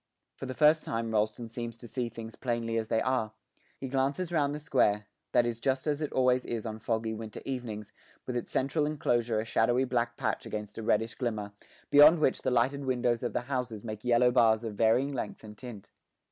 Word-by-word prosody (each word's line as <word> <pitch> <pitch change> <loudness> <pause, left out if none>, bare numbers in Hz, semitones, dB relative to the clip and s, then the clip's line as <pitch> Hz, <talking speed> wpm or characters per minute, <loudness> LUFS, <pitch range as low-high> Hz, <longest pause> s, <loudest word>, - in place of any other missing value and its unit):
For 135 - -7
the 130 - -5
first 155 +1 +5
time 115 0 -2
Rolleston 110 +2 0
seems 115 0 -6
to 120 - -10
see 120 0 -3
things 115 0 -9
plainly 115 -2 -2
as 110 - -4
they 110 0 +1
are; 125 -4 0 0.4
he 135 - -5
glances 140 +6 -1
round 145 -3 +1
the - - -5
square 105 -9 +2 0.3
that 120 - +4
is 120 -1 -2
just 130 +2 0
as 150 -1 0
it 150 - -2
always 125 -1 +3
is 115 -2 -4
on 110 -1 -5
foggy 110 0 -1
winter 110 -1 -7
evenings, 115 -6 -5 0.3
with 125 - -4
its 120 - -3
central 145 +3 0
enclosure 120 -7 0
a 110 - -2
shadowy 120 +3 +2
black 120 -2 -1
patch - - -1
against 105 0 -5
a - - -3
reddish 110 +1 +1
glimmer, 110 -5 -3 0.4
beyond 150 +4 +8
which 150 -4 +1
the - - 0
lighted 130 +3 +1
windows 125 -2 +1
of 120 - -3
the - - 0
houses 125 -5 -3
make 110 -2 -6
yellow 125 0 +4
bars 115 -2 +4
of 110 -2 -4
varying 115 +7 +2
length 115 -5 -5
and 105 -1 -10
tint. 120 -6 -10
120 Hz, 210 wpm, -30 LUFS, 110-130 Hz, 0.4 s, beyond